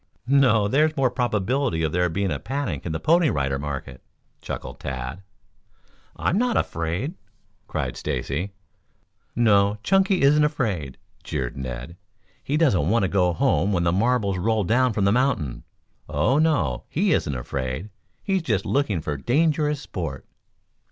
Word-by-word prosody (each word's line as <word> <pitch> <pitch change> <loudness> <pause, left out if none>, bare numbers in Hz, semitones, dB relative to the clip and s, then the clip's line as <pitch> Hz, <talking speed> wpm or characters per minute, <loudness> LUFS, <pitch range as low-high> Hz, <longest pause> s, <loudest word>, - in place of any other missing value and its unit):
"No, 125 -6 +4
there's 155 +7 +2
more 130 -3 +2
probability 120 -4 0
of 80 - 0
there 90 +1 +1
being 95 +2 -1
a 70 - -2
panic 120 - -3
in - - -2
the 80 - -2
Pony 170 - +3
Rider 70 - -1
market," 70 -1 -6 0.4
chuckled - - -6
Tad. 65 +6 -5 0.9
"I'm 190 - 0
not 245 -1 +1
afraid," 85 - -2 0.5
cried - - -3
Stacy. 85 +9 -3 0.8
"No, 105 -3 +3
Chunky 195 -3 +3
isn't 150 +2 +5
afraid," 100 - -1 0.3
jeered 65 -4 -3
Ned. 65 +5 -6 0.5
"He 145 - 0
doesn't 100 - +3
want 115 0 +3
to 95 - +1
go 90 -3 +2
home 85 +3 +1
when 85 -2 +1
the 85 - +2
marbles 100 -1 +1
roll 110 +2 +1
down 125 +6 +2
from 100 -2 0
the 100 - +4
mountain! 105 - 0 0.4
Oh, 75 - +2
no, 160 -1 +1
he 185 +2 +2
isn't 75 - 0
afraid! 65 - -4 0.3
He's 190 -2 +1
just 110 - -1
looking 110 - 0
for 75 -2 -3
dangerous 150 - +1
sport." 80 - -5
100 Hz, 150 wpm, -24 LUFS, -, 0.9 s, isn't